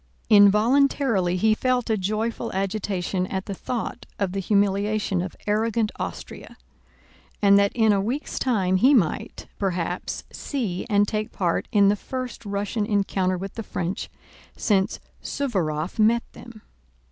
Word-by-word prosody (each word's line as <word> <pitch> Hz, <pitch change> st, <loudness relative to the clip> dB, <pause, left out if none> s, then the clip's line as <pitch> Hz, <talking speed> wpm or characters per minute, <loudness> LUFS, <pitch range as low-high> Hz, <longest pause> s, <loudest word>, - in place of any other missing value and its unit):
Involuntarily 210 Hz, -1 st, +4 dB
he 215 Hz, +4 st, +3 dB
felt 250 Hz, +1 st, 0 dB
a -, -, +3 dB
joyful 215 Hz, +4 st, -2 dB
agitation 190 Hz, -1 st, -2 dB
at 190 Hz, 0 st, -4 dB
the 200 Hz, -, -4 dB
thought 240 Hz, +4 st, -5 dB
of 195 Hz, -3 st, -1 dB
the 195 Hz, -, -3 dB
humiliation 200 Hz, 0 st, +1 dB
of 185 Hz, 0 st, -5 dB
arrogant 220 Hz, +1 st, +1 dB
Austria -, -, -7 dB, 0.8 s
and 200 Hz, -1 st, +6 dB
that 200 Hz, 0 st, +3 dB
in 220 Hz, -3 st, +4 dB
a 195 Hz, -, +2 dB
week's 250 Hz, +9 st, -3 dB
time 195 Hz, -8 st, +1 dB
he 260 Hz, +8 st, +5 dB
might, 175 Hz, -11 st, 0 dB
perhaps, 180 Hz, -2 st, -2 dB
see 225 Hz, -11 st, -3 dB
and 205 Hz, -1 st, +3 dB
take 215 Hz, 0 st, -2 dB
part 175 Hz, -3 st, -1 dB
in 200 Hz, -3 st, +5 dB
the 205 Hz, -, +3 dB
first 255 Hz, +3 st, -6 dB
Russian 205 Hz, +1 st, -2 dB
encounter 195 Hz, -3 st, 0 dB
with 195 Hz, +2 st, -6 dB
the 225 Hz, -, -5 dB
French 180 Hz, -3 st, -4 dB, 0.5 s
since 200 Hz, 0 st, +1 dB, 0.2 s
Suvórov 180 Hz, -, -2 dB
met 230 Hz, +2 st, +4 dB
them. 235 Hz, -3 st, -13 dB
205 Hz, 140 wpm, -24 LUFS, 190-225 Hz, 0.8 s, and